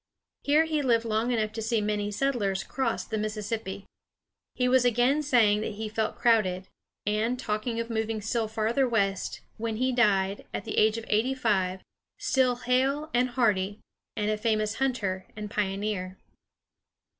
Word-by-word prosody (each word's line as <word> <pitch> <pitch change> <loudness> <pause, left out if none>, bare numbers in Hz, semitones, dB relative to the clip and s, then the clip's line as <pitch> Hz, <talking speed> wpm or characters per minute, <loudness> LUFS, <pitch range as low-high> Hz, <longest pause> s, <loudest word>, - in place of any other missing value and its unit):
Here 300 +3 +4
he 310 -2 0
lived 235 -4 +2
long 225 +2 0
enough 220 -3 0
to 225 0 -5
see 225 +1 +1
many 210 0 -1
settlers 210 -5 0
cross 260 -3 -2
the 220 - -3
Mississippi. 210 -2 -4 0.7
He 250 - +1
was 255 0 +4
again 245 +5 +3
saying 225 -7 +3
that 220 - -3
he 220 +1 -4
felt 220 0 -2
crowded, 195 -6 +2 0.4
and 215 +4 0
talking 225 0 -2
of 230 0 -3
moving 220 0 -1
still 220 +2 -1
farther 225 +4 +1
west, 200 -4 0 0.2
when 225 0 -2
he 255 +2 +1
died, 200 -5 +2
at - - -4
the 220 - 0
age 215 +1 +4
of 225 - -6
eighty 230 +5 +1
five, 190 -7 0 0.3
still 255 -2 +2
hale 265 +5 0
and 250 +1 +2
hearty, 210 -5 +1 0.4
and 210 0 0
a 215 - 0
famous 215 -1 0
hunter 210 -9 -1
and 210 -1 -6
pioneer. 195 -2 -2
220 Hz, 160 wpm, -28 LUFS, 210-245 Hz, 0.7 s, Here